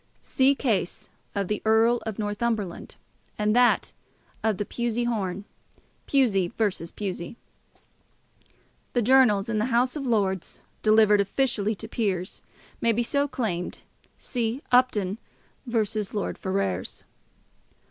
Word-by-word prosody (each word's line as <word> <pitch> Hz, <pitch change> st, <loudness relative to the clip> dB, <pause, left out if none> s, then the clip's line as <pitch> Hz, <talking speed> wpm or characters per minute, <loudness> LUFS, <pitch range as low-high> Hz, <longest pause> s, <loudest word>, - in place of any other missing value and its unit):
See 270 Hz, +1 st, +2 dB
case 215 Hz, -10 st, -1 dB, 0.3 s
of 200 Hz, -2 st, -1 dB
the 210 Hz, -, -2 dB
Earl 225 Hz, +2 st, +4 dB
of 220 Hz, -, -4 dB
Northumberland; 210 Hz, -2 st, -2 dB, 0.4 s
and 210 Hz, +1 st, +1 dB
that 245 Hz, 0 st, +3 dB, 0.5 s
of 220 Hz, -3 st, +1 dB
the 205 Hz, -, -2 dB
Pusey 235 Hz, +1 st, -1 dB
horn, 200 Hz, -4 st, -2 dB, 0.6 s
Pusey 220 Hz, -10 st, +3 dB
v. 205 Hz, -6 st, -1 dB
Pusey. 190 Hz, 0 st, -4 dB, 1.6 s
The 245 Hz, -, +2 dB
journals 235 Hz, -5 st, +5 dB
of 225 Hz, -2 st, -1 dB
the 215 Hz, -, +1 dB
House 250 Hz, +2 st, +1 dB
of 295 Hz, -, -3 dB
Lords, 200 Hz, -7 st, -1 dB, 0.2 s
delivered 215 Hz, -1 st, +5 dB
officially 215 Hz, 0 st, 0 dB
to 220 Hz, -, -7 dB
peers, 195 Hz, -5 st, -2 dB, 0.4 s
may 230 Hz, -, +3 dB
be 240 Hz, +2 st, +1 dB
so 280 Hz, +4 st, +1 dB
claimed. 195 Hz, -10 st, -3 dB, 0.3 s
See 240 Hz, +2 st, -3 dB
Upton 225 Hz, -5 st, +3 dB, 0.5 s
v. 230 Hz, -2 st, +2 dB, 0.3 s
Lord 205 Hz, -2 st, -3 dB
Ferrers. 140 Hz, -, -2 dB
220 Hz, 120 wpm, -26 LUFS, 200-240 Hz, 1.6 s, journals